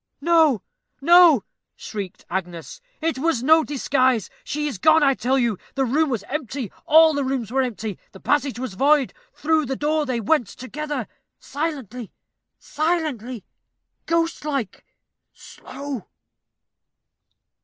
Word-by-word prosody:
"No, 320 - +3 0.4
no," 335 - +6 0.3
shrieked 200 -4 -7
Agnes; 175 - -5 0.2
"it 320 -4 -1
was 295 -5 0
no 315 +3 +5
disguise. 260 -6 +1
She 300 +1 -3
is 260 -10 -5
gone, 315 +7 +5
I 275 -1 +4
tell 255 +2 0
you 235 -6 0 0.2
the 270 -1 +1
room 295 +5 +1
was 230 -6 -2
empty, 265 -2 -5 0.2
all 320 +1 +7
the 285 -1 -1
rooms 260 -5 -2
were 265 +1 +2
empty 220 -5 -4
the 190 - -13
passage 285 -1 0
was 255 -5 -5
void 280 +5 +2 0.2
through 310 -2 0
the 265 - -2
door 300 +1 0
they 250 -2 -1
went 240 +1 +1
together 275 +1 -5 0.3
silently, 265 - -5 0.5
silently 295 - -2 0.6
ghostlike, 305 - -2 0.5
slow. 275 -4 -8
275 Hz, 125 wpm, -22 LUFS, 240-310 Hz, 0.6 s, all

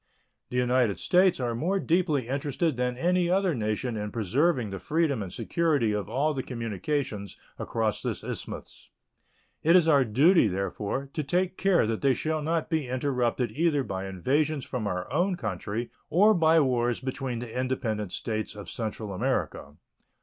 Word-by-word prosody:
The 125 - -3
United 125 -4 +2
States 185 -2 +3
are 120 -2 -1
more 175 +12 0
deeply 160 -8 +1
interested 140 +3 -1
than 125 0 -1
any 175 +3 +2
other 190 -1 +2
nation 110 0 -2
in 105 -1 -3
preserving 120 - +1
the 95 - -5
freedom 150 - 0
and 95 -3 -5
security 150 - +1
of 105 -1 -2
all 150 +4 +1
the 135 - -2
communications 115 - -3 0.2
across 110 -3 -1
this - - -3
isthmus. - - -7 0.7
It 165 +3 +5
is 175 -3 +5
our 145 -4 +5
duty, 140 - +4
therefore, 100 +7 -3
to 155 - -1
take 180 +5 0
care 190 - +3
that 110 0 -2
they 135 -2 +3
shall 155 0 -1
not 160 +1 -1
be 160 -5 -1
interrupted 125 -2 0
either 155 -3 +1
by 95 -4 -4
invasions 140 - 0
from 120 -5 -3
our 90 -2 -3
own 180 +5 +2
country 105 - -4 0.2
or 210 +6 +5
by 165 -3 +4
wars 120 -4 +1
between 130 -1 -4
the 115 -1 -7
independent 110 -6 -2
States 110 0 -3
of 105 -1 -8
Central 110 -2 -4
America. 75 -5 -2
130 Hz, 165 wpm, -27 LUFS, 110-160 Hz, 0.7 s, It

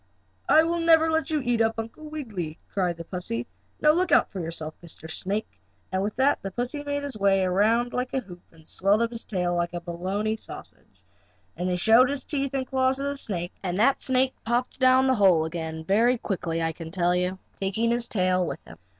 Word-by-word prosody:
"I 315 - +7
will 340 +1 0
never 325 -1 +5
let 320 +1 0
you 305 -2 0
eat 245 -2 +1
up 225 0 +1
Uncle 230 +8 -7
Wiggily!" 210 - -5 0.2
cried 180 -4 0
the 170 - -6
pussy. 165 -10 -4 0.3
"Now 300 - +5
look 355 +3 +1
out - - +4
for 195 - -5
yourself, 160 -2 -5
Mr. 160 -1 -9
Snake!" 195 +6 -4 0.3
and 190 0 0
with 205 +2 -2
that 265 +3 +2
the 195 - -4
pussy 245 +8 -3
made 285 0 -2
his 280 -6 -5
back 195 -2 +3
round 225 +6 +2
like 250 0 -2
a - - +2
hoop, 180 -6 -12
and 165 - -20
he - - -24
swelled 200 +7 +2
up 230 - -1
his 230 -1 -6
tail 180 -4 -1
like 175 0 -1
a - - -2
bologna 190 +6 -2
sausage, - - -10 0.5
and 180 +1 -2
he 180 - +1
showed 225 +7 +5
his 280 -1 -3
teeth 275 -2 -2
and 265 -1 -1
claws 260 0 +1
to 275 - -4
the 280 0 -2
snake, 180 -10 -3
and 180 -2 -2
that 265 +6 +3
snake 260 0 +2
popped 240 +3 -1
down 260 0 +5
the 260 - +4
hole 190 -8 +4
again 160 -1 -5
very 230 +7 +3
quickly, 170 -6 -2
I 165 - 0
can 165 0 -8
tell 175 0 +1
you, 180 +1 0 0.2
taking 210 +4 0
his 235 0 -1
tail 185 -2 +1
with 175 - -5
him. - - -13
210 Hz, 220 wpm, -26 LUFS, 180-260 Hz, 0.5 s, I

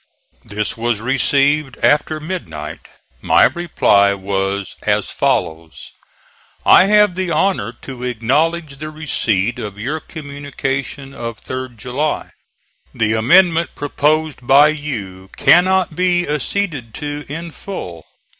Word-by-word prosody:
This 105 0 -3
was 115 -1 -1
received 135 +3 +1
after 150 +1 +2
midnight. 115 - -6 0.3
My - - +4
reply 100 -12 +3
was 95 0 -2
as - - 0
follows: 80 -2 -2 0.7
"I 185 - +7
have 210 -1 +4
the 185 0 -2
honor 160 - 0
to 130 -2 -8
acknowledge 140 +6 0
the 155 +2 -6
receipt 120 -8 -1
of 105 -3 -6
your 140 +9 -3
communication 140 -2 -5
of 115 -3 -7
3d 130 -2 -6
July. 130 +7 -3 0.6
The 110 -1 +1
amendment 170 +9 +3
proposed 150 +1 0
by 145 +3 +7
you 105 -12 -5
cannot 180 -1 +4
be 175 0 +1
acceded 150 - -2
to 145 -1 -5
in 165 +3 -6
full. 90 - -7
140 Hz, 115 wpm, -18 LUFS, 110-160 Hz, 0.7 s, I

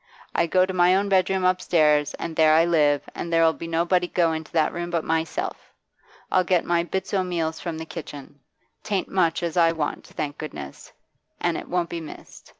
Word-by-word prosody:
I 170 - +2
go 185 +2 +3
to 190 - -5
my 180 0 +4
own 200 +1 +1
bedroom 190 0 +2
upstairs, 155 -5 +2
and 165 -1 -6
there 155 -1 +5
I 165 +1 +5
live, 150 -4 +2
and 170 - -5
there 165 0 +4
'll 160 - +4
be 165 - -8
nobody 175 +2 +1
go 170 -2 +1
into 160 0 -6
that 160 -2 +2
room 175 0 -4
but 170 -2 -1
myself. 160 0 -3 0.6
I'll 185 - +4
get 180 -1 +1
my 170 -1 +2
bits 190 +4 -4
o' 190 -2 +2
meals 165 -3 -2
from 170 -3 -5
the 160 - -6
kitchen. 145 -4 -9 0.4
'Tain't 200 -3 -2
much 170 -3 +1
as 170 +1 -2
I 165 -1 +4
want, 155 -3 -4
thank 145 -1 -5
goodness, 70 - -8 0.5
an' - - 0
it - - -6
won't 175 -1 -1
be 170 - -4
missed. 155 - -12
170 Hz, 205 wpm, -24 LUFS, 160-180 Hz, 0.6 s, there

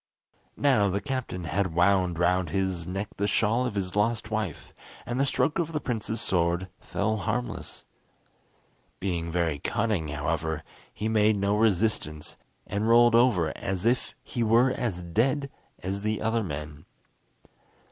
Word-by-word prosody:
Now 120 -8 +3
the 95 +2 0
captain 130 -8 -4
had 85 +1 -1
wound 90 -1 +3
round 90 0 +2
his 95 -2 -1
neck 95 +3 -3
the 100 - 0
shawl 115 +4 +2
of 105 - -5
his 95 -2 -2
lost 110 +1 0
wife, 110 -8 -3 0.3
and 120 +1 -2
the 140 - +2
stroke 150 +4 +1
of 165 -1 -1
the 155 - 0
prince's 115 -4 -3
sword 85 +1 +1
fell 110 +2 -1
harmless. 110 +3 -4 1.1
Being 85 -3 -2
very 85 -4 0
cunning, 105 -2 -1
however, 75 +1 -2 0.3
he 110 - -3
made 110 -1 +3
no 100 +1 +1
resistance, 105 -8 0 0.3
and 105 +3 -1
rolled 120 0 +6
over 115 -9 +3
as 95 +1 -3
if 120 +2 +1
he 120 - -4
were 115 +3 +4
as 110 -9 -2
dead 135 - 0 0.3
as 95 +2 -2
the 110 +1 -1
other 115 +1 0
men. 75 -3 -6
100 Hz, 145 wpm, -27 LUFS, 90-115 Hz, 1.1 s, rolled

